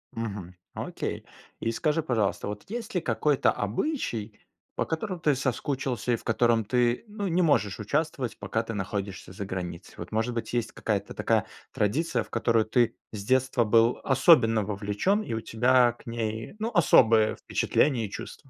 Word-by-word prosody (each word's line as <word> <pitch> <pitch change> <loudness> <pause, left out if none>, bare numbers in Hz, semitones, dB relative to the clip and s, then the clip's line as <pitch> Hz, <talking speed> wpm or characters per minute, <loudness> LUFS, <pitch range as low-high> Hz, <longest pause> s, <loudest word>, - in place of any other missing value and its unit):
Мгм. 100 -6 -5 0.2
Окей. - - -4 0.3
И 115 - -1
скажи, 155 +5 0
пожалуйста, 110 -10 0
вот 105 0 -5
есть 225 -2 -5
ли 180 - +2
какой-то 150 -3 +2
обычай, 110 - -3 0.4
по - - 0
которому 180 +3 -3
ты 150 -4 +2
соскучился, 130 -2 -1
и - - +4
в - - -10
котором 115 -1 +2
ты, 120 - +1
ну, 205 -1 -4
не 180 +1 +2
можешь 115 - +2
участвовать, 135 +2 -2
пока 100 +3 -1
ты 115 0 -6
находишься 100 -1 -4
за 100 +2 -6
границей? 90 -2 -6
Вот, 85 - -8
может 115 +3 0
быть, 115 - -4
есть 120 -2 -1
какая-то 100 -3 -2
такая - - +1 0.3
традиция, 130 +12 0
в - - -19
которую 115 -2 +2
ты 120 +1 +2 0.2
с 105 -2 -6
детства 130 +1 +2
был 115 +2 +4
особенно 130 -5 +5
вовлечен, 105 - 0
и 120 - -5
у 110 - -2
тебя 120 +2 +3
к 120 - -19
ней, 115 - -4
ну, 225 +2 -2
особые 110 -9 +5
впечатления 125 -7 +1
и - - -13
чувства? - - -7
115 Hz, 170 wpm, -27 LUFS, 105-140 Hz, 0.4 s, особенно